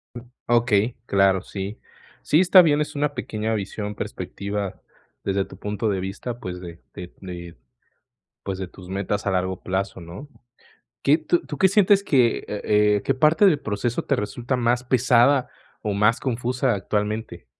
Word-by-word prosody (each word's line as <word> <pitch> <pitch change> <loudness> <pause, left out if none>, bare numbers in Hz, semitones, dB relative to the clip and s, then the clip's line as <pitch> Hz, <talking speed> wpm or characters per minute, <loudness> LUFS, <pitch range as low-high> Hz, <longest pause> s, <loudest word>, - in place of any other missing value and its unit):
Mm, - - -5 0.3
okey, 120 -1 +2
claro, 95 -3 +3
sí. 100 +2 -6 0.4
Sí, 150 - +3
está 185 +1 +8
bien, 150 -4 +3
es 150 - -4
una 145 0 0
pequeña 110 -4 -3
visión, 105 0 -4
perspectiva 100 0 -5 0.4
desde 95 0 0
tu 95 - -13
punto 105 +2 -2
de 95 -2 0
vista, 100 +6 -5
pues, 90 -4 -6
de 85 -2 -10
de 90 0 -9
de, 85 -2 -8 0.9
pues, 95 -1 -4
de 95 - -4
tus 90 0 -14
metas 100 +1 -2
a 100 - +1
largo 95 0 -1
plazo, 95 0 -3
¿no? 85 - -9 0.8
¿Qué 145 +3 +4
tú 165 +2 +1
tú 145 - -6
qué 190 - +5
sientes 200 0 +4
que, 125 -9 +3
eh - - -11 0.2
eh, 105 -1 +3
qué - - +1
parte 155 +8 +4
del 165 -7 +4
proceso 110 +3 -2
te - - +1
resulta 120 +5 -2
más 120 0 +1
pesada 125 +1 +3 0.3
o 105 - -1
más 105 +3 +3
confusa 125 0 0
actualmente? 105 -2 -3
105 Hz, 165 wpm, -23 LUFS, 95-125 Hz, 0.9 s, está